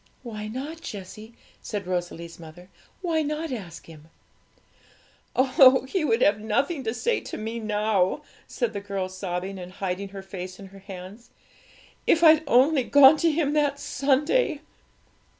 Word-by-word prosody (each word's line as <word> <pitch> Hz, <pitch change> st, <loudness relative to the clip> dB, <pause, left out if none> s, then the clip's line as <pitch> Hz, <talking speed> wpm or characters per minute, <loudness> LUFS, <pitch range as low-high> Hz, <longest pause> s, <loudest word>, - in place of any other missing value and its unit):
'Why 215 Hz, -3 st, -6 dB
not, 280 Hz, +9 st, -6 dB
Jessie?' 215 Hz, -, -9 dB, 0.3 s
said 205 Hz, -3 st, -5 dB
Rosalie's 175 Hz, -2 st, -4 dB
mother; 170 Hz, +3 st, -13 dB, 0.3 s
'why 330 Hz, -3 st, +1 dB
not 305 Hz, +1 st, -3 dB
ask 190 Hz, -9 st, -7 dB
Him?' 155 Hz, -1 st, -14 dB, 1.3 s
'Oh, 260 Hz, 0 st, +5 dB
He 365 Hz, +4 st, -1 dB
would 245 Hz, -5 st, +2 dB
have 205 Hz, +1 st, +3 dB
nothing 265 Hz, +8 st, -1 dB
to 225 Hz, -, -1 dB
say 475 Hz, -, 0 dB
to -, -, -7 dB
me 225 Hz, +2 st, -4 dB
now,' 210 Hz, +2 st, 0 dB, 0.2 s
said 240 Hz, -3 st, -2 dB
the 200 Hz, -, -3 dB
girl, 195 Hz, -2 st, -4 dB
sobbing, 185 Hz, 0 st, -5 dB
and 180 Hz, 0 st, -9 dB
hiding 195 Hz, +1 st, -4 dB
her 195 Hz, 0 st, -9 dB
face 185 Hz, -1 st, -8 dB
in 200 Hz, -, -11 dB
her 195 Hz, +1 st, -14 dB
hands. 195 Hz, +3 st, -11 dB, 0.8 s
'If 335 Hz, -, +4 dB
I'd 315 Hz, -1 st, +7 dB
only 270 Hz, +3 st, +4 dB
gone 280 Hz, +3 st, +7 dB
to 335 Hz, +2 st, +2 dB
Him 300 Hz, -2 st, 0 dB
that 290 Hz, -2 st, +1 dB
Sunday!' 290 Hz, -, +1 dB
220 Hz, 150 wpm, -25 LUFS, 190-285 Hz, 1.3 s, I'd